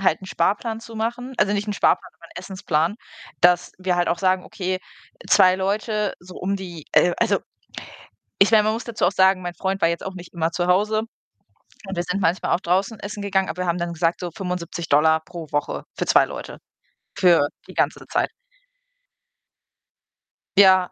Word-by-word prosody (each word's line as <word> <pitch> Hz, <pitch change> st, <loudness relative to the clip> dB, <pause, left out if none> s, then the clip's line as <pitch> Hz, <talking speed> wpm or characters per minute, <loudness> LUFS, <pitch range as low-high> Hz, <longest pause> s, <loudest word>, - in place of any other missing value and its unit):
halt 185 Hz, -3 st, +2 dB
'nen 190 Hz, -, -10 dB
Sparplan 220 Hz, +4 st, 0 dB
zu 230 Hz, -, -11 dB
machen. 240 Hz, +4 st, -3 dB
Also, 205 Hz, 0 st, +3 dB
nicht 205 Hz, +1 st, -2 dB
'nen 210 Hz, -, -1 dB
Sparplan, -, -, +1 dB
sondern 170 Hz, -1 st, -17 dB
Essensplan, 180 Hz, -2 st, -1 dB, 0.5 s
dass 180 Hz, 0 st, +4 dB
wir 185 Hz, -1 st, 0 dB
halt 175 Hz, -1 st, +1 dB
auch 170 Hz, -, 0 dB
sagen: 185 Hz, 0 st, +1 dB
„Okay, 185 Hz, -1 st, -3 dB, 0.5 s
2 185 Hz, 0 st, +6 dB
Leute 210 Hz, +2 st, -1 dB
so 180 Hz, +1 st, -13 dB
um 195 Hz, +2 st, -2 dB
die“ 175 Hz, -5 st, -8 dB
äh, 175 Hz, 0 st, +4 dB
also, 210 Hz, -4 st, +2 dB, 1.0 s
ich 195 Hz, -, +5 dB
meine, 215 Hz, -2 st, +6 dB
man 215 Hz, +1 st, +1 dB
muss 230 Hz, -, -4 dB
dazu 235 Hz, -2 st, -1 dB
auch -, -, +3 dB
sagen, 190 Hz, 0 st, +4 dB
mein 175 Hz, -1 st, -5 dB
Freund 195 Hz, +2 st, -2 dB
war 165 Hz, -, +4 dB
jetzt 170 Hz, -, -3 dB
auch 190 Hz, -, -5 dB
nicht 180 Hz, -1 st, -11 dB
immer 165 Hz, -1 st, -1 dB
zu 175 Hz, +1 st, -1 dB
Hause 210 Hz, +4 st, +2 dB, 0.9 s
und 195 Hz, -, -5 dB
wir 175 Hz, -, 0 dB
sind 180 Hz, +3 st, -2 dB
manchmal 175 Hz, 0 st, +1 dB
auch -, -, -1 dB
draußen 195 Hz, +4 st, 0 dB
essen 205 Hz, 0 st, -6 dB
gegangen, 190 Hz, -1 st, 0 dB
aber 180 Hz, -, -3 dB
wir 180 Hz, -, -2 dB
haben 170 Hz, +1 st, 0 dB
dann 170 Hz, 0 st, -3 dB
gesagt, 170 Hz, +1 st, 0 dB
so 175 Hz, -2 st, -4 dB
75$ 170 Hz, -4 st, +1 dB
pro 170 Hz, -2 st, -8 dB
Woche 145 Hz, 0 st, -2 dB
für -, -, -1 dB
2 -, -, +5 dB
Leute -, -, -8 dB, 0.6 s
für 170 Hz, -5 st, +5 dB, 0.2 s
die -, -, -11 dB
ganze -, -, 0 dB
Zeit. -, -, 0 dB, 2.3 s
Ja, 185 Hz, -2 st, +6 dB
185 Hz, 185 wpm, -22 LUFS, 175-200 Hz, 2.3 s, 2